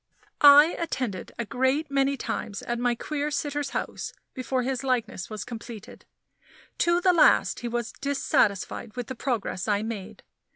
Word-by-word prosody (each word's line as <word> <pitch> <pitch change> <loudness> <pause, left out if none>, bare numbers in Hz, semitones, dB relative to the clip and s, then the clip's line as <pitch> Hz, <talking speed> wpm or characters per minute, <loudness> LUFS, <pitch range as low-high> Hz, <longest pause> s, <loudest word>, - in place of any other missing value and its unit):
I 290 +3 +8
attended 255 - -3
a 235 - -2
great 260 +6 0
many 275 0 +2
times 205 -4 -4
at 240 0 -3
my 245 0 +1
queer 295 +4 -3
sitter's 290 0 -2
house - - -4 0.2
before 255 0 -2
his 265 +1 -2
likeness 240 -7 -1
was 215 -3 -5
completed. 230 -2 -9 0.7
To 345 +1 +3
the 365 0 +4
last 340 - +4
he 240 - -4
was 240 0 -3
dissatisfied 235 -6 0
with 245 -1 -4
the - - -3
progress 230 -7 -2
I 205 0 +1
made. 220 -4 -6
255 Hz, 155 wpm, -26 LUFS, 230-285 Hz, 0.7 s, I